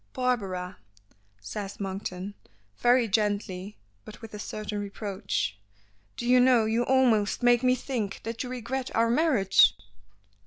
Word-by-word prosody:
"Barbara," 195 -8 -2 0.6
says 195 - -6
Monkton, 190 0 -5 0.4
very 245 -1 +3
gently, 205 -2 -1 0.3
but 210 - -12
with 225 -1 -11
a 210 - -7
certain 210 0 -5
reproach, 200 - -3 0.6
"do - - -4
you 250 +1 +5
know 245 -3 +5
you 225 +2 +1
almost 240 -5 +2
make 240 -1 +5
me 255 0 +3
think 235 -6 -4
that 230 +1 -4
you 250 - -4
regret 255 +1 -4
our 230 0 +3
marriage." 245 - +4
220 Hz, 130 wpm, -27 LUFS, 200-245 Hz, 0.6 s, you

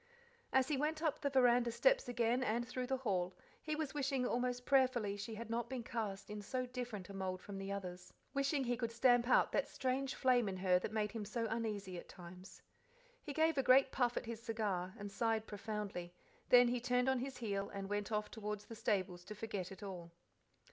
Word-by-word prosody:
As 265 -1 +4
he 295 - +1
went 310 +3 -1
up 310 -3 0
the 280 - +1
veranda 245 -3 +4
steps - - +3
again 240 +1 +2
and 240 +1 0
through 250 0 -3
the 265 +1 0
hall, 185 -7 -1 0.2
he 310 -1 -2
was 310 -2 -3
wishing 270 -3 0
almost 245 0 -1
prayerfully 255 -7 +3
she 220 +2 -5
had 230 +2 -6
not 235 0 -1
been 255 -3 -3
cast 210 -5 -4
in 210 0 -5
so 255 +5 -2
different 245 -6 -5
a - - -7
mould 190 -1 -3
from 195 +1 -7
the 195 0 -4
others, 180 -2 -6 0.2
wishing 275 0 +1
he 245 -1 0
could 235 -1 -2
stamp 240 0 +4
out - - +5
that - - +1
strange 265 +1 -1
flame 245 -5 +3
in 190 - -4
her 185 -1 +3
that 195 - -4
made 210 -1 0
him 225 -2 -4
so 230 +3 -2
uneasy 205 -5 -2
at - - -13
times. 180 +1 -11 0.6
He 295 - -6
gave 315 0 +2
a - - +5
great 265 +1 +6
puff 245 -2 +1
at - - -2
his 230 -1 -5
cigar, 205 -5 -2
and 205 -1 -6
sighed 225 +1 0
profoundly; 205 -5 -5 0.3
then 245 -1 +8
he 245 0 0
turned 250 +1 +2
on 265 -1 +3
his 265 +1 -4
heel 200 -4 -2
and 195 -1 -5
went 205 +1 -2
off 210 -1 -1
toward 210 -2 -4
the 230 - -10
stables 185 -5 -1
to 210 - -7
forget 205 -4 -4
it 195 - -9
all. 180 -4 -6
230 Hz, 215 wpm, -37 LUFS, 200-255 Hz, 0.6 s, then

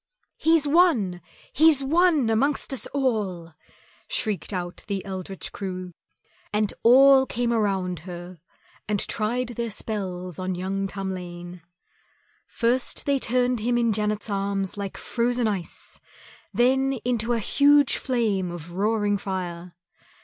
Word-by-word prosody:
"He's 320 -2 +3
won, 280 - +3 0.3
he's 300 -2 +5
won 310 -4 +3
amongst 275 +5 +1
us 265 - 0
all," 205 - -2 0.5
shrieked 220 - -1
out 175 -2 -5
the 200 -2 -3
eldritch 190 -1 -6
crew, 185 -2 -6 0.6
and 210 0 0
all 265 +2 +7
came 240 0 -1
around 190 -5 0
her 175 +1 -9 0.5
and 210 -1 0
tried 235 +3 -1
their 235 -1 -3
spells 185 -5 -5
on 185 0 -2
young 195 +2 -2
Tamlane. 180 -2 -6 0.9
First 240 +2 -1
they 280 -1 +2
turned 250 0 +1
him 240 +3 0
in 235 -2 +2
Janet's 210 0 -1
arms 195 -2 -2
like 200 -1 -5
frozen 240 0 0
ice, 195 -5 -5 0.5
then 265 +2 +2
into 240 -1 0
a - - +1
huge 285 +5 +4
flame 215 -8 0
of 170 -1 -8
roaring 205 +2 0
fire. 180 -3 -5
210 Hz, 125 wpm, -25 LUFS, 185-250 Hz, 0.9 s, all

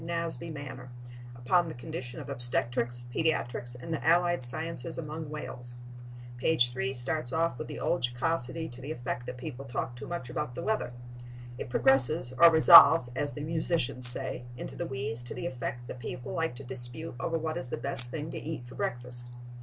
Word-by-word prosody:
Nasby 165 -3 -5
manner 130 -4 -9 0.5
upon 165 +9 0
the 160 - -8
condition 125 +2 -8
of 145 - -9
obstetrics, 120 -2 -2
pediatrics 120 -6 -2
and 125 +7 -6
the 160 - -5
allied 175 0 +2
sciences 155 +2 +2
among 155 -1 -7
whales. 125 -5 -9 0.6
Page 120 -2 +1
3 130 +1 -3
starts 130 +1 -3
off 160 -5 -1
with 155 - -6
the 150 - -8
old 170 +3 -1
jocosity 135 +5 -3
to 125 +1 -12
the 140 +4 -7
effect 120 -3 -6
that 125 - -7
people 135 0 -8
talk 125 -1 -5
too 125 - -10
much 170 -8 -6
about 120 0 -5
the 170 - -6
weather. 215 - -2 0.7
It - - -7
progresses 135 +1 +2
or 170 - +8
resolves, 160 -4 +8
as 145 +1 -3
the 145 - -8
musicians 155 -5 +4
say, 125 0 +7
into - - -8
the 175 - -5
wheeze 130 -4 -5
to 120 - -9
the 125 - -6
effect 120 -1 -6
that 125 - -9
people 120 +1 -8
like 165 -6 -3
to 140 - -11
dispute 130 +5 -6
over 165 - -2
what 160 0 -4
is 125 - -6
the - - -4
best 120 -1 +8
thing 155 +3 -6
to - - -6
eat 155 -5 -7
for 125 - -13
breakfast. 120 0 -5
130 Hz, 190 wpm, -28 LUFS, 120-160 Hz, 0.7 s, or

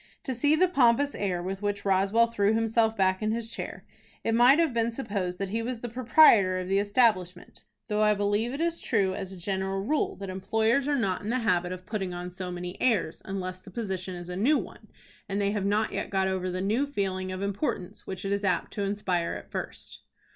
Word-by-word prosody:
To 265 - -2
see 290 +5 +3
the 365 +4 +4
pompous 280 -3 +3
air 180 -4 -2
with 190 +2 -4
which 205 -1 -2
Roswell 195 +4 +3
threw 215 -2 +1
himself 225 0 +1
back 190 0 +2
in 215 0 0
his 230 0 -3
chair, - - -7 0.4
it - - 0
might 245 +5 +6
have 330 -5 +2
been 230 0 +1
supposed 200 -7 -3
that 195 0 -3
he 225 +2 -1
was 235 0 -4
the 240 - -4
proprietor 230 -6 +5
of 185 0 -4
the 195 +1 +2
establishment, 200 -4 0 0.2
though 210 0 0
I 210 0 +4
believe 205 +3 0
it 280 +4 -4
is 335 0 0
true, 200 -6 +1
as 190 -1 -5
a 190 - -8
general 190 +1 -2
rule, 300 +6 0
that 195 -1 -6
employers 220 +8 +1
are 290 -1 +2
not 195 -7 0
in 205 - -5
the 250 - +1
habit 180 -3 +1
of 185 0 -7
putting 190 -5 -3
on 180 +1 -6
so 180 0 -6
many 180 +1 -6
airs, 210 -10 +1
unless 185 -1 -4
the 185 - -14
position 190 -3 -4
is 175 0 -8
a 180 - -5
new 255 +11 +3
one, - - -8 0.4
and 200 +1 -1
they 200 0 +1
have 205 -2 -2
not 210 +2 +1
yet - - -3
got 190 -1 +1
over 185 -1 -1
the 180 +1 -3
new 225 +9 +1
feeling 190 -7 -2
of 185 +1 -4
importance 200 - -3
which 190 0 -6
it 195 - -1
is 200 0 0
apt 190 - 0
to 205 - -3
inspire 195 -4 -1
at - - -10
first. - - -6
200 Hz, 225 wpm, -28 LUFS, 185-230 Hz, 0.4 s, might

